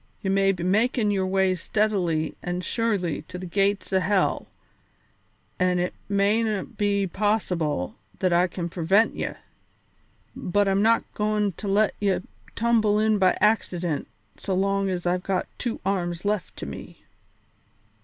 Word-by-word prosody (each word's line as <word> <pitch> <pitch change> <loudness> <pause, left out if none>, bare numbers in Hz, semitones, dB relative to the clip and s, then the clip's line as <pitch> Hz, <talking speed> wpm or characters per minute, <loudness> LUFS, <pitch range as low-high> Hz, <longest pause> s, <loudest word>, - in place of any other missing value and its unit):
Ye 190 - 0
may 195 0 +3
be 180 -3 -4
makin' 215 +3 +2
your 190 -2 0
way 190 0 +2
steadily 180 -4 0
an' 175 0 -3
surely 195 -4 -1
to 185 - -7
the 185 - -6
gates 195 +2 0
o' 190 - +4
hell 190 0 +1 1.1
an' 180 -1 +2
it 180 0 -1 0.2
mayna 205 +1 +2
be 200 -1 0
possible 180 - -1 0.2
that 185 -2 +1
I 175 +1 +4
can 175 -1 -4
prevent 185 +6 +2
ye, - - -2 1.1
but 205 +3 +1
I'm 195 0 +2
not 225 +2 +4
goin' 210 -1 0
to 200 +4 -7
let 205 +2 +3
ye 200 -2 +1 0.4
tumble 225 -3 +2
in 215 -1 +2
by 185 -1 +3
accident 180 -7 +1 0.3
so 190 - -2
long 195 +1 +1
as 180 -2 -3
I've 180 +1 +1
got 190 0 -1
two 240 -2 -2
arms 180 -2 -1
left 210 -1 -2
to - - -5
me." - - -9
195 Hz, 150 wpm, -25 LUFS, 180-210 Hz, 1.1 s, o